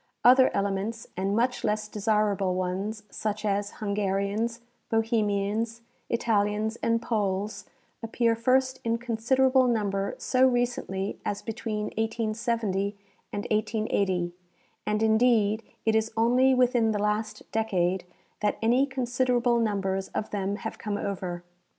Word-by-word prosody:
Other 255 +2 +7
elements, 200 +3 -1
and 195 +2 0
much 245 +2 +1
less 215 0 0
desirable 205 -3 +1
ones, 190 +4 -2
such 215 0 -3
as 200 0 0
Hungarians, 205 +3 -1 0.3
Bohemians, 225 0 0 0.3
Italians 215 -1 +1
and 230 0 +1
Poles, 205 -2 -2 0.4
appear 230 0 +1
first 260 +2 +2
in 230 0 +1
considerable 255 +3 +2
number 200 -4 0
so 260 0 +3
recently 240 -6 -1
as 205 - -3
between 215 -2 -3
1870 220 -3 -1 0.3
and 205 - -4
1880, 200 -5 0 0.5
and, 210 +1 +1
indeed, 220 -1 +3 0.2
it 220 -1 +3
is 220 +1 +1
only 250 +3 +4
within 245 -3 +3
the - - 0
last 210 +1 -1
decade 190 -5 0 0.4
that 210 0 0
any 245 +5 +3
considerable 250 -2 +1
numbers 195 -3 0
of 215 - -2
them 200 -1 -1
have 220 +1 -6
come 210 -2 -2
over. 180 -4 -4
215 Hz, 120 wpm, -27 LUFS, 200-235 Hz, 0.5 s, Other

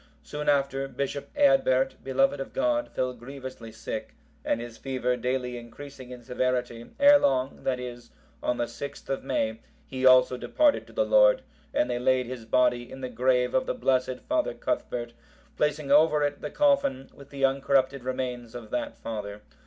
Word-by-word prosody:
Soon 150 - -3
after, 135 -1 +1
Bishop 135 +1 -4
Eadbert, 270 - +4
beloved 135 +1 +1
of 135 - -6
God, 300 +1 0
fell 130 0 -2
grievously 130 -1 -9
sick, - - -6 0.3
and - - 0
his 120 -1 -7
fever 130 -2 -1
daily 125 0 -2
increasing 130 +2 -11
in 125 -1 -10
severity, 125 -2 -2
ere 285 +1 +8
long, 135 - 0
that 130 -1 0
is, 120 -1 -8 0.3
on 125 - 0
the - - 0
6th 130 +4 -8
of 135 - -2
May,(763) 110 -4 -1 0.3
he 130 -1 -6
also 130 0 +6
departed 295 - +2
to - - -16
the - - +1
Lord, - - +5 0.3
and 295 +2 +1
they 120 - -2
laid 130 0 +2
his 120 -2 -7
body 120 +1 +1
in 135 - -9
the 130 - -4
grave 125 +1 +1
of 130 - +1
the - - -1
blessed 130 -1 0
father 310 0 0
Cuthbert, 120 - -3 0.4
placing 150 -1 0
over 150 0 +5
it 145 0 -2
the 150 - -4
coffin, 275 - +1
with 140 -1 -15
the 135 -1 +1
uncorrupted 135 -1 +1
remains 125 -2 -4
of 120 -3 -9
that 290 -1 -3
father. 105 -2 -6
130 Hz, 175 wpm, -27 LUFS, 125-145 Hz, 0.4 s, ere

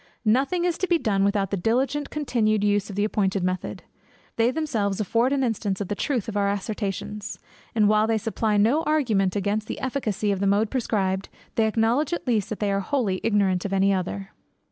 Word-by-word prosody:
Nothing 275 +11 +2
is 350 -1 0
to 375 - 0
be 345 - +3
done 200 -9 +1
without 200 -1 +1
the 200 - 0
diligent 265 +9 0
continued 220 -8 0
use 205 -1 +1
of 200 - -6
the 205 - +1
appointed 195 -3 0
method. 185 0 -3 0.5
They 230 +1 +3
themselves 235 -10 -1
afford 230 +5 +1
an 275 -1 +1
instance 210 -5 -1
of 200 - -4
the - - 0
truth 245 -1 -1
of 220 - -5
our 200 -1 +2
assertions; 205 0 -4 0.4
and 215 -2 +4
while 215 +1 +3
they 225 -1 +2
supply 220 0 0
no 235 +10 +3
argument 230 - +1
against 205 +2 -1
the - - -5
efficacy 220 -6 -1
of 195 - -1
the 200 - +1
mode 205 +2 +2
prescribed, 195 -7 -1 0.2
they 220 -1 +2
acknowledge 235 +8 +1
at 345 - -3
least 220 -5 +1
that 215 - -4
they 205 -1 0
are 195 - +1
wholly 200 -4 -1
ignorant 200 -4 +2
of 200 - -3
any 195 +1 +3
other. 195 +2 -3
210 Hz, 205 wpm, -25 LUFS, 200-240 Hz, 0.5 s, and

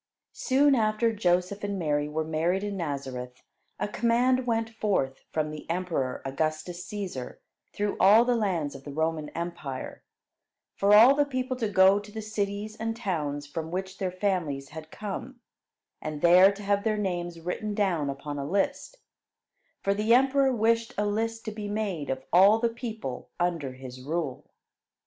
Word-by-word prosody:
Soon 280 +2 +3
after 225 -1 +2
Joseph 185 0 0
and 200 -1 -2
Mary 150 -4 0
were 155 +1 -1
married 165 +5 0
in 205 -1 -3
Nazareth, 135 -7 -5 0.4
a - - 0
command 245 +4 +2
went 225 -1 +1
forth 205 - -1
from 155 -1 -1
the 155 +1 -9
emperor 165 -7 -2
Augustus 155 +5 -2
Cæsar 185 -13 -6 0.3
through 205 0 -2
all 210 +5 +7
the 245 0 +2
lands 180 -10 -1
of 135 - -10
the 145 - -8
Roman 160 0 -1
empire, 160 -6 -5 0.7
for 200 +1 +2
all 235 +6 +9
the 290 +1 +3
people 255 -2 -2
to 225 -4 -1
go 190 0 +5
to 205 0 -12
the 220 - -6
cities 210 0 -3
and 225 +1 -3
towns 150 -9 -2
from 160 +2 -5
which 190 +2 -4
their 190 - 0
families 180 -8 -2
had 155 0 -9
come, 215 +7 -6 0.6
and 155 -1 -5
there 180 +3 +8
to 200 +1 -9
have 200 0 +1
their 215 -1 +1
names 175 -4 -3
written 205 +5 -3
down 175 -9 +1
upon 145 +1 -5
a 140 +1 -4
list, 200 - -1 0.9
for 200 - +2
the 215 +3 +3
emperor 270 +1 +4
wished 230 -1 +1
a 210 - +1
list 225 +2 -2
to 215 - -3
be 210 -1 -6
made 205 -8 -3
of 130 0 -3
all 195 +5 +7
the 235 +1 +1
people 225 - -6
under 165 -7 -1
his 130 -1 -10
rule. 150 -1 -4
190 Hz, 170 wpm, -27 LUFS, 155-215 Hz, 0.9 s, all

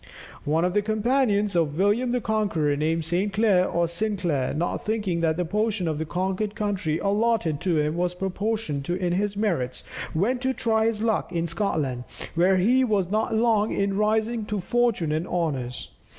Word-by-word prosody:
One 160 +4 +2
of 180 - 0
the 210 - +3
companions 215 -2 +1
of 160 -3 +1
William 210 +6 +2
the 250 0 0
Conqueror, 200 -10 0
named 160 +2 0
Saint 185 +5 0
Clair 200 -3 +3
or 170 0 +1
Sinclair, 175 -7 -1
not 165 +4 -1
thinking 205 -6 -2
that 160 -1 +1
the 180 - 0
portion 210 0 0
of 155 -2 -1
the 160 - -3
conquered 190 +5 -2
country 200 -8 -1
allotted 200 -5 +1
to 175 -3 +1
him 150 +1 0
was 180 +1 -1
proportioned 190 -5 -2
to 175 - -1
his 190 +3 -1
merits, 170 - -1 0.3
went 240 +9 +1
to 260 0 0
try 220 -1 +1
his 220 -1 -1
luck 220 -5 0
in 170 -1 -1
Scotland, 155 -8 -2 0.3
where 180 +3 +3
he 245 +8 +3
was 200 -6 0
not 220 +1 0
long 220 -2 +2
in 200 0 0
rising 220 +2 +1
to 210 0 -3
fortune 210 -5 +1
and 155 +3 -1
honours. 140 -8 -3
195 Hz, 180 wpm, -25 LUFS, 165-215 Hz, 0.3 s, the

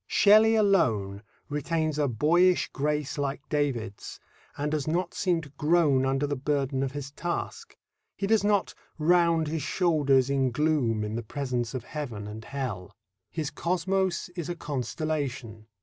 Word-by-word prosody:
Shelley 215 +2 +6
alone 115 - +2 0.3
retains 155 +1 -1
a 145 - +2
boyish 170 +9 +3
grace 150 +1 -2
like 140 +1 -3
David's, 130 -9 -2 0.4
and 150 +1 -2
does 155 -2 -1
not 170 +4 -1
seem 175 -3 0
to 150 - -12
groan 150 -4 +3
under 135 +2 +1
the 145 0 -2
burden 135 -1 -1
of 135 -1 -2
his 140 -1 -6
task. 170 +4 -5 0.4
He 200 - -2
does 220 0 +3
not 205 -2 +1 0.2
round 165 0 +3
his 160 +1 -2
shoulders 140 -6 +2
in 135 -1 +1
gloom 125 -5 +1
in 105 0 -4
the 115 - -2
presence 125 0 -3
of 125 - -4
Heaven 125 -9 -6
and 105 +2 -8
Hell. 125 -10 -5 0.3
His 155 -3 -3
cosmos 185 +1 -1
is 175 -2 -6
a 175 - -2
constellation. 135 -6 -4
150 Hz, 150 wpm, -27 LUFS, 130-170 Hz, 0.4 s, Shelley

